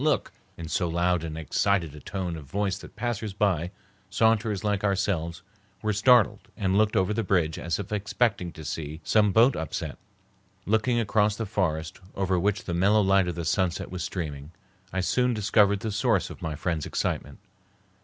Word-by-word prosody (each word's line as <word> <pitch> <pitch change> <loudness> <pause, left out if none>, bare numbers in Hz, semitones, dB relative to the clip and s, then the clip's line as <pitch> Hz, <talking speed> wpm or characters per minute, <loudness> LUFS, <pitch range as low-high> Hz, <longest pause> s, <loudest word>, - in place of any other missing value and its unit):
look!" 150 -2 +1 0.3
in 85 - -6
so 85 +2 0
loud 85 0 +1
and 80 -1 -5
excited 85 0 0
a 75 - -10
tone 90 0 -4
of 80 -3 -9
voice 95 +6 -1
that - - -13
passers 110 -2 -3
by, 95 -5 +1 0.4
saunterers 110 0 +2
like 105 -1 0
ourselves, 95 -5 -1 0.4
were 110 0 +1
startled 115 +1 +4
and 95 -1 0
looked 105 +1 +3
over 95 +3 +2
the 115 - 0
bridge 90 -6 +1
as 85 -1 -1
if 100 -1 -6
expecting 105 -2 0
to 80 - -10
see 75 0 -5
some 105 +2 +3
boat 115 +5 +5
upset. 80 -2 -4 0.7
Looking 110 +3 +2
across 105 -1 +2
the 115 - -3
forest, 90 -5 -2 0.2
over 95 -2 +1
which 105 +3 0
the 90 - -4
mellow 100 +5 +4
light 95 -1 +3
of 90 - -2
the 85 -1 -4
sunset 90 -1 0
was 90 -1 -4
streaming, 75 -5 -5 0.4
I 95 - -1
soon 125 +5 +1
discovered 100 -1 +3
the 110 - -2
source 110 -3 +1
of - - -11
my 80 -2 -3
friend's 80 -1 -2
excitement. - - -2
95 Hz, 180 wpm, -27 LUFS, 85-105 Hz, 0.7 s, boat